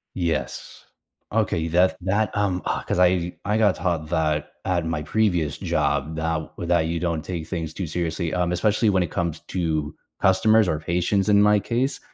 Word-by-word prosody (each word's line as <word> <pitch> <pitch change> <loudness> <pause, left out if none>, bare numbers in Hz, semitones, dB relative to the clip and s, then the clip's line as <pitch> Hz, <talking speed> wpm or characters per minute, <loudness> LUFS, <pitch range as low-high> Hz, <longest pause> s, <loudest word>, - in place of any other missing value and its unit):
Yes. 80 -8 -3 0.5
Okay, 110 -5 +1
you 80 0 -2
that 90 +2 +3
that, 100 +5 0
um, 95 -3 0
ugh - - -2
'cause - - 0
I 90 -1 +3
I 105 +2 0
got 105 -4 +3
taught 85 -4 -2
that 75 -3 0
at 85 -3 0
my 80 -2 -2
previous 90 -7 0
job 75 +1 -1
that 80 -1 -2
with 85 - -5
that 85 -2 +3
you 85 0 -2
don't 85 -3 -1
take 85 -1 -5
things 80 -4 -4
too 90 +2 -4
seriously, 85 +1 -2
um, 90 -1 0
especially 105 +4 +2
when 95 -3 +2
it 85 - -5
comes 85 -2 -2
to 80 -5 -1 0.3
customers 110 +2 +4
or 75 - -1
patients 90 +5 0
in 100 -1 +5
my 105 0 +5
case, 120 +6 -1
90 Hz, 190 wpm, -23 LUFS, 80-100 Hz, 0.5 s, in